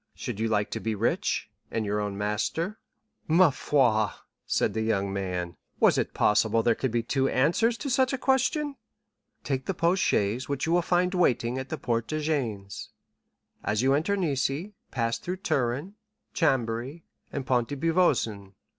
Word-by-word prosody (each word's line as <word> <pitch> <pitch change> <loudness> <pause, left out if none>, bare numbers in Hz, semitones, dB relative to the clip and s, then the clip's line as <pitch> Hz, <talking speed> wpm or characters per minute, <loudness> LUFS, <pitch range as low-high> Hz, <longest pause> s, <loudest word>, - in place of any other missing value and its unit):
should - - -5
you 115 - +1
like 105 -1 0
to - - -3
be 110 -1 -2
rich, 110 +3 -1 0.2
and 110 -1 -2
your 105 +1 0
own 100 -1 -3
master?'" 110 - -2 0.5
"Parbleu!" 140 - +3 0.4
said - - +1
the 110 - -1
young 100 -3 0
man; 90 -3 -3 0.2
"was - - +5
it - - -1
possible 110 +1 +3
there 115 - +4
could 130 +3 -2
be 115 0 0
two 135 +3 +1
answers 190 - +2
to 290 - -5
such 260 0 +2
a 270 - -1
question?" 275 +3 +1 0.7
"'Take 130 -2 -2
the 195 - -1
post 175 +3 +2
chaise 105 +7 +1
which 140 - -1
you 165 - -1
will 175 +1 +4
find 180 +2 +1
waiting 130 -8 +1
at 130 0 -6
the - - -3
Porte 115 -1 -1
de 155 - -2
Gênes, 115 - -3 0.8
as 105 +3 0
you 135 +1 +4
enter 165 +8 +1
Nice; 145 -9 +1 0.4
pass 115 -3 -1
through 180 +1 -4
Turin, 145 0 -1 0.4
Chambéry, 130 - 0 0.3
and 140 -2 -4
Pont 125 -3 +1
de 145 - -5
Beauvoisin. 115 - +1
130 Hz, 170 wpm, -27 LUFS, 110-170 Hz, 0.8 s, was